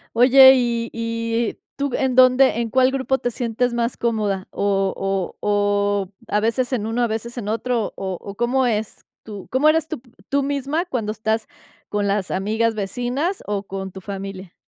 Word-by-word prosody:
Oye, 265 +2 +8
¿y-y 230 -1 -1 0.2
tú 280 -1 -1
en 265 -2 0
dónde 255 -1 +5
en 230 - -1
cuál 255 +2 +3
grupo 265 0 0
te 245 - -2
sientes 240 +1 -1
más 235 0 -1
cómoda? 215 -5 -1
¿0 195 -1 0
o 195 -2 -2
o 205 -1 +1 0.2
a 210 - +1
veces 245 +3 0
en 215 -4 -1
uno, 225 +2 -1
a - - +2
veces 230 +2 -5
en 210 -3 -4
otro? 230 +1 -1
¿O 190 -2 -4
o 200 0 -9
cómo 250 +3 +1
es 220 -2 -3 0.2
tú 205 -3 -9
cómo 270 +4 +3
eres 320 0 +2
tú 315 - -6 0.3
tú 280 0 +1
misma 285 +3 -1
cuando 235 - -3
estás 220 0 -1 0.4
con 205 -1 -1
las 200 -1 0
amigas, 220 +4 0
vecinas 245 - -2
o 205 -1 -2
con 190 -1 -6
tu 190 - -9
familia? 195 -2 -7
230 Hz, 175 wpm, -21 LUFS, 205-255 Hz, 0.4 s, Oye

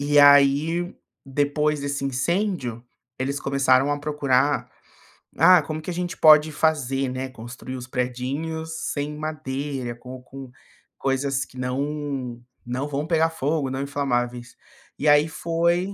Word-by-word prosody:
e 145 +1 +2
aí 145 +5 +5 0.3
depois 145 +2 0
desse 140 0 -3
incêndio, 135 - -1 0.4
eles 140 +2 -2
começaram 135 0 +3
a 145 - -2
procurar, 145 -2 +1 0.7
"Ah, 185 -2 +7
como 155 +1 -5
que 170 - -7
a - - -2
gente 175 0 -3
pode 155 0 +7
fazer, 135 -4 0
né, 130 +1 -4
construir 125 +1 -8
os 125 -1 -7
predinhos 135 +6 -3 0.2
sem 145 +1 -3
madeira, 140 -5 -4
com 125 +1 -10
com 130 0 -11 0.5
coisas 135 0 0
que 130 - -17
não 135 -1 -3 0.2
não 130 +4 -3
vão 145 +1 -3
pegar 165 -1 +3
fogo, 150 -2 -1
não 130 +1 -3
inflamáveis", 125 -4 -2 0.4
e 150 - -2
aí 145 +1 +6
foi 170 +4 0
140 Hz, 135 wpm, -24 LUFS, 130-155 Hz, 0.7 s, Ah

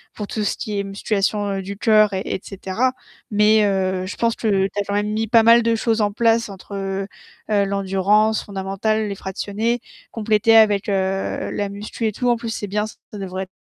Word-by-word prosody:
pour 210 - -4
tout 215 0 -3
ce - - -1
qui 210 -2 -3
est - - -1
musculation 200 0 -1
du 195 +1 -6
cœur 215 -1 +4
et 190 - -1
et - - -2
cetera. 200 +6 -1 0.4
Mais 210 0 +4
heu, 190 -2 0
je 200 - -6
pense 230 0 0
que 225 - -3 0.2
tu 195 - -17
as - - +1
quand 200 - -2
même 210 +1 0
mis 220 +1 -1
pas 230 0 +5
mal 230 +1 +7
de 230 0 +2
choses 225 0 0
en 205 -1 +1
place 230 0 +2
entre, 195 +1 -9
heu, 195 0 -3 0.4
heu, 200 -1 +3
l'endurance 200 +2 +1
fondamentale, 200 +2 -1
les 200 - -4
fractionnés, 210 +5 -2 0.3
compléter 220 0 +2
avec, 210 -2 +4
heu, 195 -1 -1
la 205 -1 -2
musculation 210 +3 -4
et - - 0
tout. 245 +4 0
En 240 - +3
plus 230 -1 -5
c'est 210 -2 -4
bien 210 +2 -1
ça 215 - -12 0.2
devrait 190 0 -5
205 Hz, 205 wpm, -21 LUFS, 195-220 Hz, 0.4 s, mal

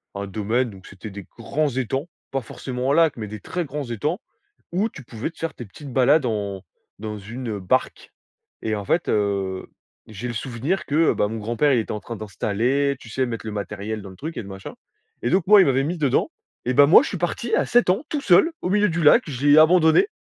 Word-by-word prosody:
Un 100 0 -4
domaine, 110 +5 -1
donc 95 -3 -13
c'était 100 +2 -10
des 100 -1 -9
grands 145 +6 -1
étangs, 135 +4 -2 0.2
pas 135 - -1
forcément 125 +2 -4
un - - +3
lac, 165 -2 +4
mais 110 -3 -6
des 110 0 -7
très 180 - -3
grands 145 -1 -5
étangs, 150 - -2 0.5
où 205 +6 +1
tu 135 - -12
pouvais 115 +4 -5
te - - -30
faire 165 -2 -3
tes 120 - -9
petites 135 +6 -11
balades 135 +3 +4
en 100 -4 -2 0.4
dans 105 0 -5
une, 115 +6 -7
heu, 105 - -4
barque 90 - -1 0.5
et 110 -1 -1
en 105 - -4
fait, 165 - +1
heu, 100 -3 -1 0.4
j'ai 110 +3 -6
le 120 - -4
souvenir 130 - -2
que, 155 +3 +3
ben, 105 - 0
mon 115 - -4
grand-père, 120 +7 +1
il 125 - +3
était 110 - -3
en 105 - -4
train 115 - -7
d'installer, 120 +7 0
tu 125 - -13
sais, 130 +3 0
mettre 115 -3 -5
le 110 - -5
matériel 105 +1 -4
dans 100 - -10
le 95 - -12
truc 160 +3 -6
et - - -3
le 100 - -11
machin 95 0 -8 0.5
et 120 - 0
donc 185 +4 +1
moi, 210 0 +8
il - - +5
m'avait 135 0 +2
mis 175 +4 -2
dedans 145 -5 +1 0.4
et 125 - 0
ben, 145 - +8
moi, 160 - +8
je - - -3
suis 190 - -4
parti 175 +7 -1
à - - +1
7 240 -5 +3
ans, 195 +9 +2
tout 295 - -2
seul, 205 - +5
au - - -2
milieu 210 +2 +3
du 170 0 -1
lac. 150 - +6
Je 140 -1 -2
l'ai 145 +1 +7
abandonné. 160 - +6
125 Hz, 240 wpm, -23 LUFS, 105-155 Hz, 0.5 s, moi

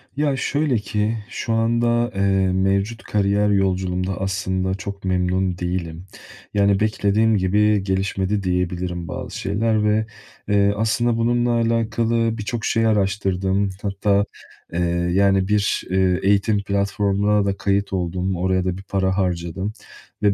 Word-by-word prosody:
Ya 145 -1 +1
şöyle 145 -2 0
ki 105 +2 -1
şu 115 -1 -3
anda, 120 +1 +1
eee, 95 - -1 0.3
mevcut 100 +4 0
kariyer 100 0 +1
yolculuğumda 95 -1 0
aslında 95 -1 -1
çok 100 0 -7
memnun 90 0 0
değilim. 90 -1 -4 0.5
Yani, 100 -1 +3
beklediğim 110 0 +2
gibi 105 +2 +2
gelişmedi 95 +1 -1
diyebilirim 90 -1 -2
bazı - - -6
şeyler 105 +2 0
ve, 105 +1 +2 0.4
eee, 100 -1 +3
aslında 115 +2 +1
bununla 120 +1 +1
alakalı 115 0 +1
birçok 110 +1 -4
şey 115 0 +1
araştırdım. 95 -1 0
Hatta, 100 0 +1 0.5
eee, 85 - -1 0.3
yani, 95 0 +3
bir, 105 -1 +1
eee, 95 -1 +2
eğitim 100 +1 +2
platformuna 100 +1 +1
da 100 0 -1
kayıt 100 0 0
oldum. 90 +1 -1
Oraya 95 +1 0
da 90 -1 -1
bir 95 - -10
para 95 -1 -1
harcadım 90 +2 -2 0.5
ve 100 -1 +4
100 Hz, 130 wpm, -21 LUFS, 95-110 Hz, 0.5 s, ve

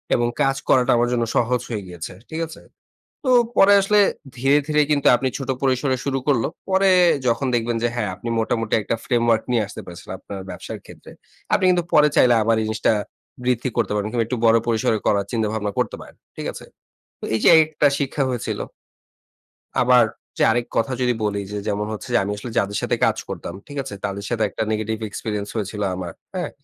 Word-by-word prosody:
এবং 120 0 +1
কাজ 135 0 +3
করাটা 125 -2 +4
আমার 120 +1 +2
জন্য 120 -1 +1
সহজ 125 +1 +2
হয়ে 110 -4 -3
গিয়েছে। 85 -2 -7 0.2
ঠিক 160 0 -4
আছে? 160 - -12 0.6
তো 260 - 0 0.3
পরে 200 +1 +7
আসলে 210 +2 +3 0.4
ধীরে, 135 +3 +3
ধীরে 150 0 +3
কিন্তু 145 -2 +2
আপনি 130 +2 -1
ছোট 135 -2 -6
পরিসরে 130 0 +1
শুরু 135 -1 0
করল। 120 -6 +3 0.3
পরে 190 +1 +4 0.4
যখন 120 +3 +1
দেখবেন 120 0 0
যে 120 - +3
হ্যাঁ 120 - -1
আপনি 115 +5 -6
মোটামুটি 115 -1 -1
একটা 115 - -1
ফ্রেমওয়ার্ক 115 -2 +2
নিয়ে 115 -3 +2
আসতে - - -8
পেরেছেন 85 0 -11
আপনার 100 0 -8
ব্যবসার 90 - -7
ক্ষেত্রে। - - -13 0.4
আপনি 185 - +3
কিন্তু 180 -1 +3
পরে 150 0 +6
চাইলে 125 -1 +6
আবার 115 +1 +3
এই 110 - -1
জিনিসটা 110 0 +1 0.5
বৃদ্ধি 125 +1 +1
করতে 115 -4 +1
পারবেন 105 0 -1
কিংবা 115 -2 0
একটু 125 0 -2
বড় 115 0 +6
পরিসরে 110 -1 +1
করার 100 -1 +2
চিন্তা 110 -2 0
ভাবনা 105 -2 -2
করতে - - -1
পারেন। - - -13 0.2
ঠিক - - -5
আছে? - - -10 0.5
তো - - -18
এই - - 0
যে - - +5
এই 160 - +8
একটা 150 -2 +2
শিক্ষা 140 0 -1
হয়েছিল। 120 -3 -3 1.2
আবার - - +6 0.3
যে - - +2
আরেক 120 +1 0
কথা 115 +3 +1
যদি 125 0 +2
বলি 100 -1 -1
যে, 105 - -3
যেমন 105 +1 -1
হচ্ছে 110 - -7
যে - - +5
আমি 100 - -3
আসলে 115 +3 -7
যাদের 100 0 -1
সাথে - - 0
কাজ - - +1
করতাম - - -6
ঠিক 145 -1 -8
আছে? 105 - -7
তাদের 100 0 -4
সাথে 115 -2 0
একটা - - -3
negative 110 +1 -2
experience 105 -1 -4
হয়েছিল 105 -1 -3
আমার। 90 -2 -6 0.2
হ্যাঁ? 180 - -2
120 Hz, 205 wpm, -22 LUFS, 105-135 Hz, 1.2 s, এই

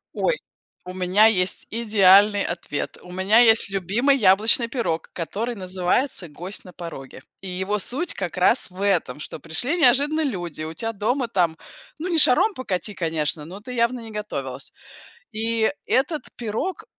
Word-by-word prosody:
Ой, - - 0 0.5
у 180 - -7
меня 185 +3 +3
есть 190 -4 +2
идеальный 205 -2 +5
ответ. 170 -4 -4
У 180 - -13
меня 190 +5 +3
есть 225 -3 +5
любимый 205 +9 +1
яблочный 220 +1 +4
пирог, 225 - -3
который 225 +8 -4
называется 185 +3 -1
"Гость 180 +8 -8
на 180 - -11
пороге". 135 -6 -9 0.2
И 195 - -8
его 190 +3 -2
суть 290 - 0
как 180 -2 -5
раз 185 +6 +3
в 185 +1 -14
этом: 170 -9 0
что 155 - -7
пришли 245 - 0
неожиданно 290 +4 +4
люди, 175 - -4
у 160 +1 -6
тя 225 +4 -2
дома 240 +5 -1
там, 175 -7 0 0.4
ну, 350 +4 -4
не 330 -2 +3
шаром 350 - +5
покати, 210 - -3
конечно, 160 -3 -2
но 185 +5 -9
ты 250 +4 -9
явно 235 +1 0
не 225 -1 -10
готовилась. 210 0 -5 0.6
И 225 0 0 0.2
этот 295 +1 0
пирог, 235 - -4
205 Hz, 160 wpm, -23 LUFS, 180-240 Hz, 0.6 s, идеальный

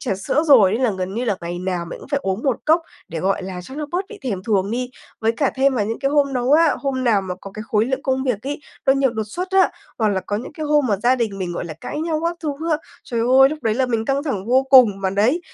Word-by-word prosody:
trà 225 -7 -1
sữa 195 +10 0
rồi 225 -10 +6
nên 225 - -1
là 245 - +3
gần 185 +1 -3
như 240 +3 -2
là 210 -5 0
ngày 175 +1 -5
nào 180 -1 -2
mình 170 - -8
cũng - - -13
phải 280 0 0
uống 190 +3 -2
một 265 -4 +1
cốc 320 +2 +4 0.3
để, 165 0 -5
gọi 195 +3 0
là, 185 -1 -6
cho 265 - -11
nó 300 +1 -4
bớt 365 +3 0
bị 435 - -10
thèm 200 -8 -3
thuồng 200 -2 0
đi. 250 +2 -2 0.3
Với 225 0 +2
cả 270 +4 0
thêm 270 0 +3
vào 210 -5 +1
những 225 +1 -3
cái 275 - 0
hôm 285 -1 +2
nấu 250 +1 +1
á 320 0 +5
hôm 265 -2 -2
nào 220 -5 +3
mà 185 -1 -4
có 195 - -9
cái 215 - -6
khối 215 0 +2
lượng 265 +2 -2
công 265 0 0
việc 240 -6 -1
ấy, 285 +2 -4 0.3
nó 270 - +6
nhiều 270 -1 +2
đột 220 -2 -3
xuất 360 - -5
á, 385 0 +4 0.3
hoặc 220 -2 +2
là 195 -2 0
có 205 - -3
những 230 - -7
cái 305 0 -5
hôm 295 -2 +3
mà 210 -4 +1
gia 240 +6 +2
đình 225 -6 -2
mình, 180 -2 -3
gọi 175 - -4
là, 165 -2 -7
cãi 295 - -5
nhau 320 -1 -1
các 340 +1 -1
thứ 300 -3 -2 0.2
á, 310 - +3 0.3
trời 235 -2 -2
ơi! 260 +3 +6
Lúc 305 +2 -5
đấy 220 -1 +1
là 260 +2 +1
mình 230 -3 -1
căng 275 +3 0
thẳng 215 -10 -3
vô 255 +3 +4
cùng, 235 -7 +7
mà 190 -1 0
đấy, 220 - +2
245 Hz, 305 wpm, -21 LUFS, 200-275 Hz, 0.3 s, cùng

